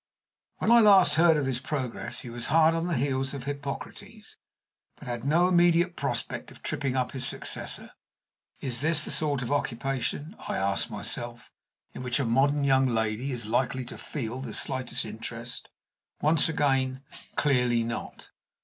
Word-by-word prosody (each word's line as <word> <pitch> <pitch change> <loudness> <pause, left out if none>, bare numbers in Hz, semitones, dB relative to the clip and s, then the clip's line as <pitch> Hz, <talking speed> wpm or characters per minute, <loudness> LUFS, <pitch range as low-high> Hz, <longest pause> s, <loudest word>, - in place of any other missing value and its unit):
When 225 - +1
I 235 - +8
last 195 -8 +7
heard 165 0 +5
of 145 - 0
his 130 -2 -1
progress 130 -3 -4
he 125 - -8
was 120 0 -4
hard 160 0 +5
on 165 +1 -1
the 175 - 0
heels 135 +1 -1
of 135 - -6
Hippocrates, 145 - -7 0.6
but 140 - -13
had 120 -1 -4
no 170 +5 +4
immediate 175 0 +3
prospect - - -2
of - - -16
tripping 135 -2 -2
up 130 -1 0
his 130 -2 -3
successor, - - -3 0.7
Is 125 -2 -1
this 155 0 +4
the - - -2
sort 145 -4 +1
of 125 - -4
occupation 140 - -2
(I - - -2
ask 100 +4 +1
myself) 120 +3 -5 0.4
in - - -7
which 125 0 0
a 140 - 0
modern 140 +5 +2
young 135 -1 +4
lady 115 +2 -1
is 120 -3 -4
likely 125 +3 0
to - - -8
feel 125 -3 -5
the 120 -5 -5
slightest 130 -2 -1
interest? 115 +2 -7 0.5
Once 155 +1 +3
again, 135 -3 +1 0.3
clearly 125 -5 +2
not. 115 0 -6
135 Hz, 165 wpm, -27 LUFS, 120-150 Hz, 0.7 s, I